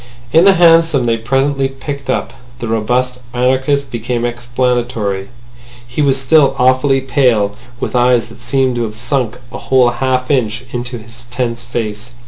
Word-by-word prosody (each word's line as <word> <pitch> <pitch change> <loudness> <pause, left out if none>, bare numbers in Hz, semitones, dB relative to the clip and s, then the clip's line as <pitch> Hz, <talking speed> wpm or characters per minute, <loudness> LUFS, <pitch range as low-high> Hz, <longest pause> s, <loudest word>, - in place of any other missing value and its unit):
In 165 +3 +6
the 195 - +7
hansom 165 -6 +4
they 115 -1 +2
presently 135 +4 0
picked 135 +1 -7
up, 130 - -1 0.2
the 120 - -5
robust 125 +3 -1 0.2
anarchist 130 +3 +1
became 120 +1 -2
explanatory. 120 -4 -2 0.6
He 125 +5 -3
was 135 -2 +2
still 135 +1 +3
awfully 130 +2 +3
pale, 125 -7 +1 0.2
with - - -3
eyes 125 -1 +3
that 115 +1 -14
seemed 130 0 0
to - - -1
have 105 -1 -6
sunk 125 0 -2
a 120 - -7
whole 130 -2 +3
half 130 +2 -1
inch 120 -4 0
into 120 0 -4
his 115 +2 -13
tense 120 -1 -3
face. 115 0 -5
125 Hz, 155 wpm, -15 LUFS, 120-135 Hz, 0.6 s, the